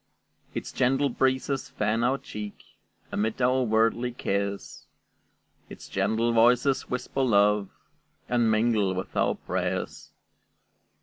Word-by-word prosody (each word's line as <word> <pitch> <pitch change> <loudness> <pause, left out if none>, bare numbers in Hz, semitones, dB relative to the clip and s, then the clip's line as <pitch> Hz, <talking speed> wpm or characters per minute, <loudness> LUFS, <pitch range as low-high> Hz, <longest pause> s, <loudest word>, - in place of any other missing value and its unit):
Its - - -4
gentle 135 +2 +2
breezes 130 +2 0
fan 110 +2 -1
our 130 +3 +2
cheek; 105 -5 -8 0.5
Amid 110 +3 -1
our 130 +1 +3
worldly 115 +1 +1
cares, 100 -4 -3 0.8
Its - - -11
gentle 110 +4 0
voices 125 +4 +3
whisper 125 +2 -2
love, 105 -4 +3 0.6
And 120 -2 +2
mingle 110 -3 +2
with 95 - -5
our - - +2
prayers. - - -3
115 Hz, 110 wpm, -27 LUFS, 105-125 Hz, 0.8 s, our